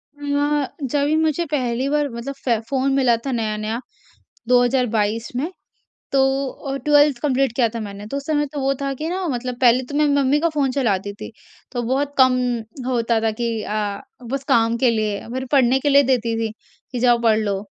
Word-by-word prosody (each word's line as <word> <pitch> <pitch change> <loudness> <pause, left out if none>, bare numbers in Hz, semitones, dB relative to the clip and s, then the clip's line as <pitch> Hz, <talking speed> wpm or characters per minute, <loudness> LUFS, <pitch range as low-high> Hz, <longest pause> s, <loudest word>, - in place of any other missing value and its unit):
अ, 290 0 0 0.2
जभी 285 +3 +1
मुझे 315 +1 +1
पहली 255 -2 0
बार 295 0 +1
मतलब 235 +4 -6
फ़े 235 -4 +2
फ़ोन 270 0 +1
मिला 255 -4 +4
था 270 - -1
नया-नया 220 -1 -2 0.7
2022 240 -3 +2
में, 290 +7 -1 0.6
तो 270 -1 +3 0.3
अ, 275 -2 -6
12th 290 -3 +4
कम्प्लीट 270 -3 +1
किया 240 -2 +3
था - - -2
मैंने। 205 -1 -7
तो 275 - -4
उस 280 - -6
समय 295 -1 +1
तो 290 - -3
वो 270 +1 +2
था 275 0 -1
कि 310 +5 -4
ना 370 +1 -2
मतलब 250 -2 -3
पहले 250 +1 +5
तो 285 - -5
मैं 300 +1 +3
मम्मी 280 +1 +3
का 335 +2 +1
फ़ोन 275 -3 +1
चलाती 205 -7 -1
थी, 205 - -9 0.4
तो 245 -2 -2
बहुत 275 +4 -1
कम 255 -1 +5 0.5
होता 235 -2 +1
था 225 -1 +1
कि 235 -1 0
अ, 210 -1 -3 0.3
बस 275 0 -2
काम 230 0 +3
के 250 0 +3
लिए, 215 -2 -2
मेरे 260 +1 -3
पढ़ने 265 -2 +4
के 290 - 0
लिए 280 0 +6
देती 240 -3 +1
थी 225 -1 -1 0.4
कि, 245 - -3
"जाओ, 240 -1 +4
पढ़ 220 -2 +4
लो।" 200 -2 -2
255 Hz, 195 wpm, -21 LUFS, 230-280 Hz, 0.7 s, लिए